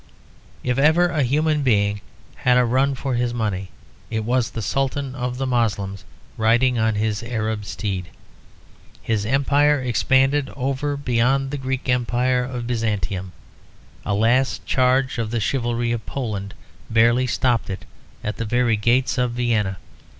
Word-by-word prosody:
If 125 +1 0
ever 160 +5 +4
a 155 -3 0
human 150 +4 +1
being 105 -5 +2 0.4
had 125 0 +3
a 125 - +4
run 135 +3 +2
for 135 +1 -3
his 120 0 0
money, 100 -5 -2 0.4
it 110 -1 -1
was 125 0 +1
the 115 - -5
Sultan 135 +2 -1
of 125 -1 -3
the 135 - -1
Moslems 100 -7 -1 0.3
riding 120 +2 +3
on 110 -1 +2
his 105 0 -1
Arab 110 -3 -3
steed. 95 -4 -4 1.0
His 105 -2 -1
empire 140 +3 +3
expanded 135 +3 +2
over 140 +2 -1
and 140 - -10
beyond 130 +3 +2
the 145 - -2
great 130 -1 -3
Greek 125 - +1
empire 125 +1 +1
of 125 -1 -5
Byzantium; 105 -6 -2 0.7
a 100 - -1
last 120 +5 +2
charge 130 0 +2
of 110 -2 -2
the 120 +1 -1
chivalry 120 0 -1
of 115 -2 -2
Poland 105 -7 -4 0.3
barely 120 +3 +3
stopped 120 -2 0
it 95 - -5 0.4
at 105 - -3
the 115 - -3
very 120 0 +2
gates 120 +5 +1
of 125 -1 +1
Vienna. 110 -6 0
120 Hz, 155 wpm, -22 LUFS, 110-130 Hz, 1.0 s, ever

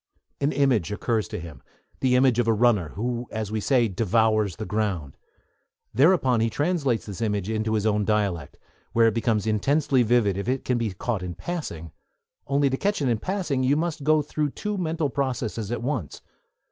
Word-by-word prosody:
An 145 +1 +1
image 130 - +2
occurs 110 +1 -1
to - - -5
him, 80 -6 -10 0.4
the 130 -1 +2
image 125 -2 +4
of 120 - +2
a 115 - +4
runner, 105 -7 +2
who, 120 +3 -3
as 110 -2 -4
we 110 - -1
say, 125 0 +3
'devours' 110 -1 +1
the 110 - -5
ground. 100 -10 -2 0.8
Thereupon 130 - +4
he 115 +1 +2
translates 145 -4 0
this 100 0 -7
image 105 -2 -1
into 110 0 0
his 105 -1 0
own 105 -1 +2
dialect, 100 -8 -1 0.4
where 115 0 +5
it 115 - +3
becomes 110 -2 0
intensely 135 +5 +2
vivid 110 -5 +2
if 100 - -3
it 130 +1 -1
can 125 -2 +1
be 115 -3 -1
caught 105 +1 -2
in 90 -1 -5
passing; 90 - -5 0.6
only, 140 +1 +2
to 135 0 0
catch 205 +6 0
it 140 -4 0
in 115 -2 +1
passing, 180 - -1
you 130 +2 +3
must 160 -2 -2
go 155 +1 +3
through 150 0 -1
two 210 +8 -4
mental 160 -5 -1
processes 120 -6 -2
at 120 - -3
once. 125 - -3
115 Hz, 190 wpm, -25 LUFS, 105-140 Hz, 0.8 s, where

